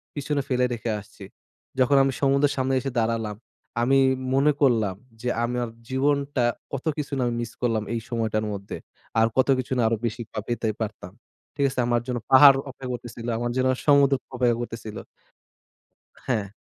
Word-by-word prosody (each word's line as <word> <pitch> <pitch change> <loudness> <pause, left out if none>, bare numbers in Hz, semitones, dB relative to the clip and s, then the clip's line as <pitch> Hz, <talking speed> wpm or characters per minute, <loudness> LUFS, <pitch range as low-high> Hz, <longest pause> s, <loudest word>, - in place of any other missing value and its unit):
পিছনে 145 0 -1
ফেলে 125 -1 +2
রেখে 115 0 -3
আসছি। 105 0 -14 0.6
যখন 130 +2 +4
আমি 135 - +1
সমুদ্রের 140 +1 +3
সামনে 130 0 0
এসে 135 +1 -4
দাঁড়ালাম, 110 -2 -1 0.5
আমি 135 +3 +4 0.3
মনে 140 +3 +4
করলাম 110 -8 +3 0.3
যে 125 - -1
আমার 120 0 -1 0.2
জীবনটা 140 -1 +1 0.3
কত 135 +2 -4
কিছু 145 -1 -4
না - - 0
আমি 120 - -1
মিস 115 -2 -5
করলাম 115 -3 +1
এই 115 - -1
সময়টার 110 -3 -1
মধ্যে। 100 0 -6 0.4
আর 115 - +5
কত 130 - +4
কিছু 130 +2 -5
না - - +2
আরো 115 0 +1
বেশিই 115 +1 -3
বা 110 - -4
পেতে 120 -1 -1
পারতাম। 105 -4 -5 0.4
ঠিক 140 - +1
আছে? 130 - -5
আমার 120 -1 +2
জন্য 125 -1 -2
পাহাড় 140 +1 +9
অপেক্ষা 130 0 -8
করতেছিল, 120 -1 -7
আমার 120 +1 -2
জন্য 130 0 +2 0.2
সমুদ্র 140 -1 +5 0.2
অপেক্ষা 120 -2 +2
করতেছিল। 115 -2 -6 1.3
হ্যা। 110 -6 0
120 Hz, 170 wpm, -25 LUFS, 115-135 Hz, 1.3 s, পাহাড়